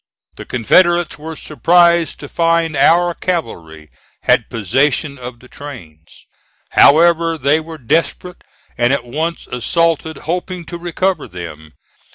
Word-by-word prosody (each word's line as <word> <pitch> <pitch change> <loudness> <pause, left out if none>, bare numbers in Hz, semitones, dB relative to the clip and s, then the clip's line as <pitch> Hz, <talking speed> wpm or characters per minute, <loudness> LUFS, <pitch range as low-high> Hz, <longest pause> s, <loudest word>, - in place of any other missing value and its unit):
The - - -10
Confederates 175 - +2
were 160 +1 -7
surprised 170 +2 +2
to 145 - -7
find 165 0 0
our 175 +5 +3
cavalry 85 - -5 0.3
had - - +2
possession 135 - 0
of 125 -1 -9
the 125 - -16
trains. 90 - -12 0.5
However, 165 +2 +4
they 145 +2 +2
were 160 0 -9
desperate 165 +6 -2 0.4
and 120 +1 +3
at 135 -3 -1
once 160 +7 -4
assaulted, 160 +5 -1
hoping 180 +1 -4
to 170 - -8
recover 175 0 -2
them. 80 -4 -10
155 Hz, 125 wpm, -16 LUFS, 125-170 Hz, 0.5 s, However